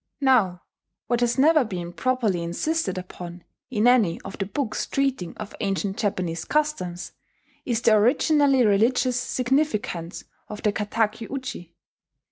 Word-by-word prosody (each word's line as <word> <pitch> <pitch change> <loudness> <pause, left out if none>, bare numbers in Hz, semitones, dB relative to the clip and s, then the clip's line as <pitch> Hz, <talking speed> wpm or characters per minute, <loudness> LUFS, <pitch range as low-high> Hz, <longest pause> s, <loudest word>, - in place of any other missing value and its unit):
Now, 220 -10 +3 0.4
what 240 -1 0
has 240 +1 +1
never 305 +2 +5
been 175 -6 -5
properly 235 -8 0
insisted 190 - -1
upon, 180 -1 -8 0.3
in 220 -4 0
any 235 -9 +4
of 195 - -8
the 195 - -2
books 245 +2 -2
treating 270 -11 -1
of 215 -1 -7
ancient 195 -1 -1
Japanese 180 -5 -2
customs, 295 -13 -2 0.5
is 235 -2 -1
the 225 - +5
originally 265 +4 +4
religious 240 +4 +2
significance 245 - -1 0.3
of 210 - -8
the 210 - +2
kataki 220 +1 -1
uchi. 255 -11 -6
215 Hz, 130 wpm, -24 LUFS, 185-255 Hz, 0.5 s, never